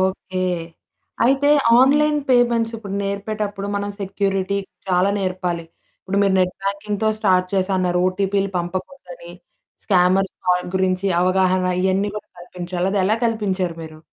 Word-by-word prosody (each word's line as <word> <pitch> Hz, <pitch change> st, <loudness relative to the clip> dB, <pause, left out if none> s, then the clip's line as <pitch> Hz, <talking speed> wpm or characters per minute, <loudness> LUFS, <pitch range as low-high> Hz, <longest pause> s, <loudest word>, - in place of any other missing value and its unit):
Okay. 185 Hz, -1 st, -2 dB, 0.8 s
అయితే 275 Hz, +3 st, +3 dB, 0.3 s
online 295 Hz, +3 st, +4 dB
payments 235 Hz, -2 st, +2 dB
ఇప్పుడు 200 Hz, -3 st, -7 dB
నేర్పేటప్పుడు, 200 Hz, 0 st, -3 dB
మనం 200 Hz, 0 st, -2 dB
సెక్యూరిటీ 195 Hz, 0 st, -1 dB, 0.3 s
చాలా 185 Hz, +2 st, +3 dB
నేర్పాలి. 180 Hz, -3 st, -2 dB, 0.4 s
ఇప్పుడు 195 Hz, +1 st, -2 dB
మీరు 195 Hz, -1 st, +2 dB
నెట్ 180 Hz, 0 st, +1 dB
బ్యాంకింగ్‌తో 205 Hz, +2 st, -1 dB
స్టార్ట్ 185 Hz, -3 st, +2 dB
చేసా 190 Hz, 0 st, +1 dB
అన్నారు, 180 Hz, -1 st, +1 dB
ఓటీపీలు 195 Hz, +1 st, 0 dB
పంపకూడదని, 270 Hz, -, -7 dB, 0.5 s
స్కామర్స్ 185 Hz, 0 st, +2 dB
కాల్ 180 Hz, 0 st, +2 dB
గురించి 185 Hz, +1 st, 0 dB
అవగాహన 185 Hz, 0 st, +2 dB, 0.2 s
ఇయన్నీ 190 Hz, +2 st, +1 dB
గూడా 210 Hz, -, -8 dB
కల్పించాలి, 180 Hz, +1 st, -4 dB
అదెలా 205 Hz, +2 st, +2 dB
కల్పించారు 190 Hz, -6 st, -1 dB
మీరు? 155 Hz, -1 st, -10 dB
195 Hz, 125 wpm, -21 LUFS, 185-205 Hz, 0.8 s, online